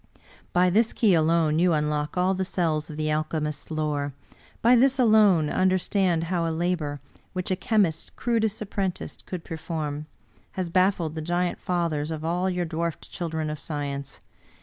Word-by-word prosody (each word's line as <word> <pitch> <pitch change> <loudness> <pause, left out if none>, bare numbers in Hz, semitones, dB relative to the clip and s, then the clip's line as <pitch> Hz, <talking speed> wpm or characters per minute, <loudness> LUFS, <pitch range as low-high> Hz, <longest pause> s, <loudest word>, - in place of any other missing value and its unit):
By 180 +1 +3
this 220 +4 +3
key 215 -5 +3
alone 160 -1 +3
you 175 0 +4
unlock 150 +1 -1
all 185 +1 +3
the 190 0 -1
cells 160 -5 -1
of 150 - -7
the 155 0 0
alchemist's 150 -1 -2
lore; 150 -3 -1 0.5
by 240 +2 +7
this 265 +2 +4
alone 215 - +5
understand 185 -1 +1
how 170 0 -1
a - - 0
labor, 160 -3 -1 0.3
which 185 0 -2
a - - +3
chemist's 195 -6 +1
crudest 220 -3 0
apprentice 195 -3 -3
could 180 -3 -6
perform, 155 -2 -4 0.5
has 180 -3 -3
bafHed 185 -3 +2
the 160 - -4
giant 175 +2 -1
fathers 165 -4 -1
of 160 -1 -4
all 180 +3 0
your 180 -1 -1
dwarfed 165 0 -4
children 160 -3 -3
of 150 - -5
science. 140 -3 -5
170 Hz, 160 wpm, -26 LUFS, 155-185 Hz, 0.5 s, by